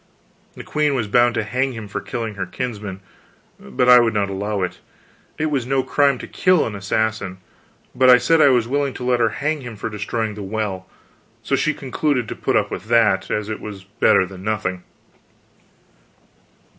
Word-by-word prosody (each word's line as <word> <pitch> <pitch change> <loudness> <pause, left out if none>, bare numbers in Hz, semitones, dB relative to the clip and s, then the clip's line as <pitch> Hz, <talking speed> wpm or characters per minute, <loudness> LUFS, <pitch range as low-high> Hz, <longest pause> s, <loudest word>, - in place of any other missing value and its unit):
The - - -9
queen 150 -2 0
was 120 -5 -1
bound 120 +3 +3
to 115 - 0
hang 130 +5 -1
him 110 -3 -7
for 100 - -5
killing 115 -3 -4
her 100 - -4
kinsman, 105 -6 -5 0.6
but 65 - -1
I 125 0 +9
would 115 -2 +1
not 100 -1 0
allow 100 0 -2
it: 90 - -4 0.6
it 155 0 -1
was 130 -4 -1
no 135 0 +1
crime 140 -1 +2
to - - -8
kill 185 -3 +2
an 110 - -4
assassin. 100 -1 -2 0.6
But 130 0 +4
I 125 - +9
said 160 +6 +3
I - - +7
was 120 -3 +2
willing 140 +1 -1
to - - -6
let 125 -1 +1
her 115 -1 +3
hang 150 +6 -2
him 120 -3 -8
for 110 - -5
destroying 105 +1 -3
the 105 - -8
well; 100 -2 -4 0.5
so - - +1
she 155 +2 0
concluded 135 -2 -1
to - - -5
put - - -1
up - - +1
with - - -5
that, 110 -4 +2
as 105 -1 -2
it 110 -1 -5
was 100 -3 -8
better 95 -1 +2
than 95 0 -11
nothing. 100 -4 -2
115 Hz, 195 wpm, -21 LUFS, 100-130 Hz, 0.6 s, I